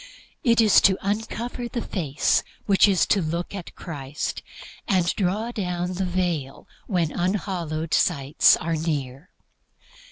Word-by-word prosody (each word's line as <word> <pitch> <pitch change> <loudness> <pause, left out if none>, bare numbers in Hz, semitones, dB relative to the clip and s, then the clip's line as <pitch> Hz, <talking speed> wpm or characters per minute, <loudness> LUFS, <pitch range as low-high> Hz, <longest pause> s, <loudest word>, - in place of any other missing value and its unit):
It 235 -4 +3
is 215 -3 +6
to 190 -1 +4
uncover 225 +4 -3
the 235 -1 -4
face 150 -7 0 0.2
which 200 0 +5
is 195 -3 +3
to 200 - +2
look 170 +3 -3
at 195 -4 -8
Christ, 145 -4 -5 0.5
and 185 -3 +2
draw 210 +5 -1
down 180 -4 -3
the 185 +1 -2
veil 175 -7 -2 0.2
when 175 -6 0
unhallowed 175 -4 -2
sights 140 -4 +4
are 165 0 -2
near. 150 -1 -3
180 Hz, 130 wpm, -24 LUFS, 160-200 Hz, 0.5 s, is